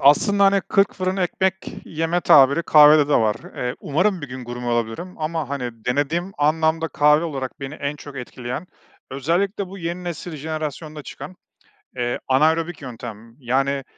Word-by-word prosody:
aslında 200 Hz, +8 st, +5 dB
hani, 195 Hz, 0 st, +4 dB
kırk 200 Hz, +1 st, +2 dB
fırın 185 Hz, +1 st, -2 dB
ekmek 190 Hz, +1 st, +1 dB, 0.3 s
yeme 165 Hz, +2 st, -1 dB
tabiri 140 Hz, +2 st, +6 dB
kahvede 150 Hz, -2 st, +7 dB
de 145 Hz, -, +3 dB
var. 110 Hz, -1 st, +3 dB, 0.2 s
Eee, 125 Hz, 0 st, -2 dB
umarım 185 Hz, +5 st, +1 dB
bir 145 Hz, -, -7 dB
gün 125 Hz, 0 st, -7 dB
gurme 120 Hz, 0 st, -6 dB
olabilirim 120 Hz, +9 st, -2 dB
ama 155 Hz, -2 st, -2 dB
hani 120 Hz, -5 st, -5 dB
denediğim 150 Hz, +9 st, -1 dB
anlamda 160 Hz, +2 st, +2 dB
kahve 150 Hz, +3 st, +3 dB
olarak 135 Hz, -2 st, -5 dB
beni 135 Hz, +2 st, -6 dB
en 145 Hz, 0 st, -4 dB
çok 145 Hz, -1 st, -11 dB
etkileyen, 125 Hz, +4 st, -6 dB, 0.4 s
özellikle 175 Hz, -, -1 dB
bu 195 Hz, +2 st, -9 dB
yeni 175 Hz, +1 st, -4 dB
nesil, 170 Hz, -1 st, -5 dB
jenerasyonda 155 Hz, 0 st, -5 dB
çıkan, 185 Hz, +5 st, -9 dB, 0.6 s
eee, 120 Hz, 0 st, -1 dB
anaerobik 160 Hz, +4 st, +2 dB
yöntem 115 Hz, -3 st, -9 dB
yani 135 Hz, +1 st, 0 dB
150 Hz, 155 wpm, -22 LUFS, 130-170 Hz, 0.6 s, kahvede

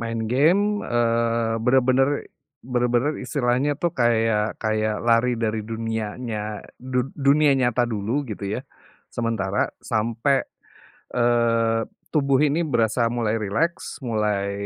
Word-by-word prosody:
Main 115 Hz, -1 st, -3 dB
game, 200 Hz, +10 st, +3 dB
eee, 115 Hz, -1 st, 0 dB
benar 125 Hz, +2 st, +3 dB
benar, 130 Hz, +2 st, +3 dB, 0.6 s
benar 125 Hz, -1 st, 0 dB
benar 125 Hz, +5 st, +1 dB
istilahnya 135 Hz, +2 st, 0 dB
tuh 170 Hz, +1 st, -1 dB
kayak 115 Hz, -3 st, +1 dB
kayak 110 Hz, -1 st, -1 dB
lari 120 Hz, +1 st, +3 dB
dari 110 Hz, -1 st, -1 dB
dunianya 110 Hz, -1 st, -4 dB, 0.2 s
du 125 Hz, -1 st, -1 dB
dunia 145 Hz, +1 st, +3 dB
nyata 125 Hz, -2 st, +2 dB
dulu 120 Hz, +5 st, -2 dB
gitu 105 Hz, -4 st, -6 dB
ya, 130 Hz, -, -7 dB, 0.5 s
sementara, 110 Hz, -4 st, -1 dB, 0.2 s
sampai, 115 Hz, +4 st, +1 dB, 0.8 s
eee, 115 Hz, -2 st, +2 dB, 0.2 s
tubuh 140 Hz, -2 st, +2 dB
ini 155 Hz, +3 st, +1 dB
berasa 115 Hz, -2 st, +1 dB
mulai 115 Hz, -2 st, -1 dB
rileks, 135 Hz, +8 st, -2 dB
mulai, 105 Hz, -4 st, 0 dB
115 Hz, 120 wpm, -23 LUFS, 110-130 Hz, 0.8 s, game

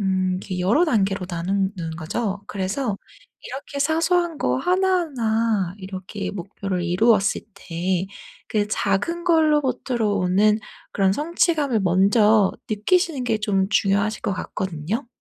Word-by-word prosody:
음 190 Hz, -1 st, +1 dB
이렇게 185 Hz, -2 st, -4 dB
여러 225 Hz, -, +3 dB
단계로 200 Hz, -, +1 dB
나누는 185 Hz, -1 st, -2 dB
거죠. 200 Hz, +5 st, -3 dB
그래서 200 Hz, +3 st, -2 dB, 0.5 s
이렇게 280 Hz, +2 st, -6 dB
사소한 330 Hz, +2 st, +1 dB
거 -, -, +1 dB
하나하나 255 Hz, -, +1 dB
이렇게 190 Hz, +1 st, -6 dB
목표를 195 Hz, -1 st, -4 dB
이루었을 200 Hz, +3 st, +3 dB
때 180 Hz, 0 st, -2 dB, 0.4 s
그 210 Hz, -1 st, 0 dB
작은 215 Hz, -, -1 dB
걸로부터로 275 Hz, -9 st, +2 dB
오는 200 Hz, +4 st, +3 dB, 0.3 s
그런 195 Hz, -1 st, +2 dB
성취감을 300 Hz, -, +1 dB
먼저 200 Hz, +3 st, +4 dB, 0.2 s
느끼시는 280 Hz, -, +1 dB
게 225 Hz, -3 st, 0 dB
좀 195 Hz, -3 st, +1 dB
중요하실 205 Hz, +1 st, +1 dB
것 -, -, -1 dB
같거든요. 190 Hz, -, -4 dB
210 Hz, 285 characters per minute, -23 LUFS, 190-265 Hz, 0.5 s, 먼저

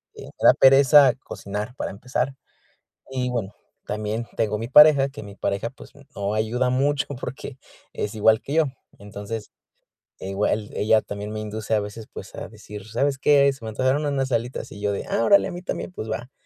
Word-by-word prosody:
me -, -, -10 dB
da -, -, +7 dB
pereza 135 Hz, 0 st, +7 dB
cocinar 105 Hz, +5 st, -6 dB
para -, -, -4 dB
empezar, 125 Hz, +5 st, -3 dB, 0.8 s
y 130 Hz, -1 st, -2 dB
bueno, 105 Hz, -5 st, -3 dB, 0.3 s
también 105 Hz, +2 st, -3 dB
tengo 105 Hz, -1 st, 0 dB
mi 115 Hz, +2 st, -5 dB
pareja, 145 Hz, 0 st, +7 dB
que 135 Hz, -, -9 dB
mi 100 Hz, -1 st, -10 dB
pareja, 100 Hz, +4 st, -2 dB
pues, 130 Hz, -, -15 dB, 0.2 s
no 100 Hz, +1 st, -2 dB
ayuda 120 Hz, +4 st, 0 dB
mucho 135 Hz, +2 st, +1 dB
porque, 130 Hz, +1 st, -7 dB, 0.3 s
es 105 Hz, -, -4 dB
igual 110 Hz, +1 st, +4 dB
que 140 Hz, -, -5 dB
yo. 160 Hz, 0 st, +4 dB, 0.3 s
Entonces, 105 Hz, +2 st, -7 dB, 0.7 s
igual 105 Hz, +2 st, -1 dB
ella 110 Hz, +1 st, +3 dB
también 100 Hz, +1 st, -6 dB
me 110 Hz, -, -4 dB
induce 110 Hz, 0 st, -3 dB
a 105 Hz, -, +2 dB
veces, 105 Hz, +2 st, -7 dB
pues, -, -, -10 dB
a -, -, -7 dB
decir: 105 Hz, -1 st, -11 dB
"¿Sabes 135 Hz, +5 st, 0 dB
qué?, 140 Hz, 0 st, +4 dB
se 135 Hz, -4 st, -13 dB
me -, -, -4 dB
antojaron 130 Hz, +6 st, 0 dB
unas 135 Hz, -2 st, -1 dB
alitas", 120 Hz, +2 st, -2 dB
y 100 Hz, -, -10 dB
yo 105 Hz, 0 st, 0 dB
de: 100 Hz, -, -4 dB
"Ah, -, -, 0 dB
órale, 200 Hz, -, +5 dB
a -, -, -6 dB
mí 175 Hz, 0 st, -7 dB
también, 185 Hz, -, -4 dB
pues 110 Hz, -10 st, -6 dB
va, 120 Hz, +4 st, -5 dB
115 Hz, 190 wpm, -23 LUFS, 105-135 Hz, 0.8 s, da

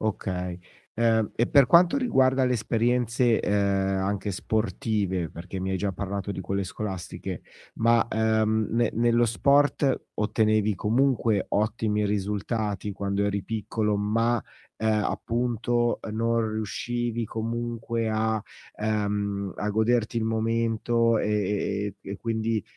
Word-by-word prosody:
Okay. 90 Hz, -4 st, -3 dB, 0.4 s
Uhm, 110 Hz, -2 st, +2 dB
e 120 Hz, -, +1 dB
per 140 Hz, -1 st, +5 dB
quanto 170 Hz, -, +5 dB
riguarda 135 Hz, -, +3 dB
le 125 Hz, -, +2 dB
esperienze, 120 Hz, +1 st, +1 dB
uhm, -, -, -1 dB
anche 100 Hz, 0 st, 0 dB
sportive, 100 Hz, -4 st, -1 dB
perché 90 Hz, +3 st, -7 dB
mi 95 Hz, +1 st, -2 dB
hai 95 Hz, -, 0 dB
già 95 Hz, +1 st, -1 dB
parlato 100 Hz, +2 st, -4 dB
di 95 Hz, -, -5 dB
quelle 100 Hz, +1 st, -2 dB
scolastiche, 95 Hz, -2 st, -5 dB, 0.3 s
ma, 115 Hz, 0 st, +3 dB
uhm, 110 Hz, 0 st, +2 dB
ne 115 Hz, 0 st, +2 dB
nello 120 Hz, +1 st, +3 dB
sport, 140 Hz, +4 st, +2 dB
ottenevi 110 Hz, 0 st, +1 dB
comunque 115 Hz, 0 st, +1 dB
ottimi 105 Hz, 0 st, 0 dB
risultati 105 Hz, 0 st, -2 dB
quando 100 Hz, +1 st, -1 dB
eri 100 Hz, -1 st, -1 dB
piccolo, 105 Hz, 0 st, -1 dB
ma, 115 Hz, +3 st, +1 dB, 0.3 s
ehm, 110 Hz, -1 st, +1 dB
appunto, 120 Hz, 0 st, 0 dB
uhm, 105 Hz, -, -6 dB
non 115 Hz, 0 st, +1 dB
riuscivi 120 Hz, +2 st, -2 dB
comunque 115 Hz, 0 st, -3 dB
a, 110 Hz, 0 st, 0 dB, 0.4 s
ehm, 100 Hz, -2 st, -1 dB
a 105 Hz, -, -2 dB
goderti 115 Hz, +2 st, +1 dB
il 110 Hz, -, -1 dB
momento 115 Hz, +1 st, +1 dB
e 105 Hz, 0 st, +1 dB, 0.6 s
e -, -, -9 dB
e 100 Hz, -, -4 dB
quindi, 115 Hz, -2 st, -1 dB
110 Hz, 125 wpm, -26 LUFS, 100-115 Hz, 0.6 s, per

